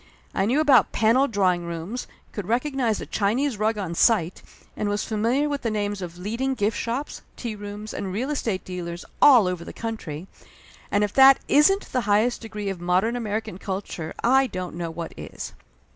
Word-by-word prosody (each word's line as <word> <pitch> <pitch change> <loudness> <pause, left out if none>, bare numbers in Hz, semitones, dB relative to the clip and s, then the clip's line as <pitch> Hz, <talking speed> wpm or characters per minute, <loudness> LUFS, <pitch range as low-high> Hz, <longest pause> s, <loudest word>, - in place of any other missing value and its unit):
I 195 - +1
knew 260 +6 +2
about 290 -5 +5
paneled 235 +5 +3
drawing 185 -4 +2
rooms, 170 +9 -5 0.2
could 205 -4 -6
recognize 245 -2 0
a - - -5
Chinese 230 +5 0
rug 215 +1 +1
on 185 -5 -3
sight 180 -2 +2 0.3
and 210 - -1
was 205 0 -1
famil 230 +6 +1
iar - - +1
with 285 -1 -2
the 230 - -1
names 205 -2 -2
of 175 -1 -7
leading 230 +8 -2
gift 210 -1 0
shops, 245 +5 -3 0.2
tea 235 -3 -4
rooms 205 +1 -7
and 190 - -4
real 245 +9 -2
estate 225 -9 -2
dealers 175 -1 -6 0.2
all 245 -9 +8
over 180 -2 -3
the - - -9
country; 185 -9 -5 0.6
and 205 +1 +2
if 205 - -1
that 270 0 +8
isn't 390 +8 +4
the 255 - +1
highest 220 +4 +2
degree 210 -3 -5
of 190 -3 -5
modern 185 +7 +1
American 215 -4 -3
culture 190 -5 -5
I 265 +3 +4
don't 185 -5 -5
know 170 -1 -3
what 165 0 -6
is. - - -8
215 Hz, 190 wpm, -24 LUFS, 185-245 Hz, 0.6 s, all